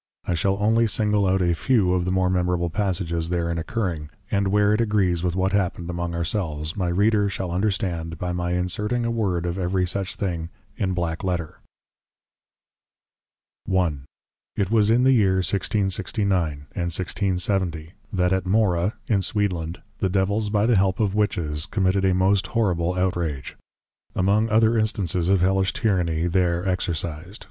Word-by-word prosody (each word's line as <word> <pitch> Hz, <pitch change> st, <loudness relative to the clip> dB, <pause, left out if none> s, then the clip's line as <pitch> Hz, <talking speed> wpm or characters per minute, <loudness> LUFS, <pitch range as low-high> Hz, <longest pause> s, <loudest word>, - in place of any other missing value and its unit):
I -, -, -1 dB
shall 95 Hz, +3 st, +1 dB
only 115 Hz, +2 st, +3 dB
single 105 Hz, -1 st, +1 dB
out 95 Hz, 0 st, +2 dB
a 85 Hz, -1 st, +2 dB
few 95 Hz, 0 st, +2 dB
of 90 Hz, -1 st, 0 dB
the 90 Hz, -, -1 dB
more 95 Hz, 0 st, +2 dB
Memorable 90 Hz, -2 st, 0 dB
passages 85 Hz, -4 st, -1 dB
therein 85 Hz, -1 st, -1 dB
Occurring; 85 Hz, -5 st, -3 dB, 0.2 s
and 100 Hz, -1 st, +1 dB
where 105 Hz, +1 st, +3 dB
it 105 Hz, -, +2 dB
agrees 100 Hz, -6 st, +1 dB
with 90 Hz, -1 st, 0 dB
what 95 Hz, +1 st, +1 dB
happened 90 Hz, -3 st, -1 dB
among 85 Hz, 0 st, -3 dB
ourselves, 80 Hz, -3 st, -2 dB
my 90 Hz, -3 st, -1 dB
Reader 100 Hz, +3 st, +2 dB
shall 95 Hz, -2 st, -4 dB
understand, 90 Hz, -4 st, -1 dB
by 90 Hz, +2 st, -3 dB
my 90 Hz, 0 st, -2 dB
inserting 105 Hz, +7 st, 0 dB
a 115 Hz, -, 0 dB
Word 95 Hz, -7 st, -1 dB
of 90 Hz, +2 st, -2 dB
every 90 Hz, 0 st, 0 dB
such 95 Hz, +1 st, -2 dB
thing 85 Hz, -4 st, -3 dB, 0.3 s
in 95 Hz, -3 st, -1 dB
\Black 85 Hz, -1 st, -2 dB
Letter\. 90 Hz, -4 st, -3 dB, 2.1 s
I. 90 Hz, -3 st, +2 dB, 0.6 s
It 100 Hz, 0 st, -1 dB
was 110 Hz, -2 st, +4 dB
in 120 Hz, +3 st, +4 dB
the 135 Hz, +1 st, +5 dB
Year 100 Hz, -6 st, +3 dB
1669. 95 Hz, -1 st, 0 dB
and 70 Hz, -, -10 dB, 0.3 s
1670. 90 Hz, -2 st, -1 dB, 0.2 s
That 90 Hz, -1 st, +1 dB
at 95 Hz, -1 st, -1 dB
Mohra 95 Hz, -1 st, +2 dB
in 105 Hz, -2 st, +2 dB
Sweedland, 90 Hz, -5 st, -2 dB, 0.2 s
the 95 Hz, -, +1 dB
\Devils\ 100 Hz, +3 st, 0 dB
by 105 Hz, 0 st, +2 dB
the 120 Hz, 0 st, +3 dB
help 95 Hz, -1 st, +1 dB
of 105 Hz, -3 st, +1 dB
\Witches\, 85 Hz, -8 st, -1 dB
committed 95 Hz, -1 st, +1 dB
a 95 Hz, -1 st, +3 dB
most 95 Hz, +2 st, +2 dB
horrible 90 Hz, -6 st, 0 dB
outrage. 85 Hz, -6 st, -2 dB, 0.6 s
Among 105 Hz, +4 st, +2 dB
other 110 Hz, +1 st, +3 dB
Instances 90 Hz, -5 st, 0 dB
of 95 Hz, -2 st, +3 dB
Hellish 95 Hz, 0 st, +2 dB
Tyranny 85 Hz, -6 st, 0 dB
there 90 Hz, 0 st, +1 dB
exercised. 85 Hz, +1 st, -3 dB
95 Hz, 160 wpm, -23 LUFS, 85-100 Hz, 2.1 s, the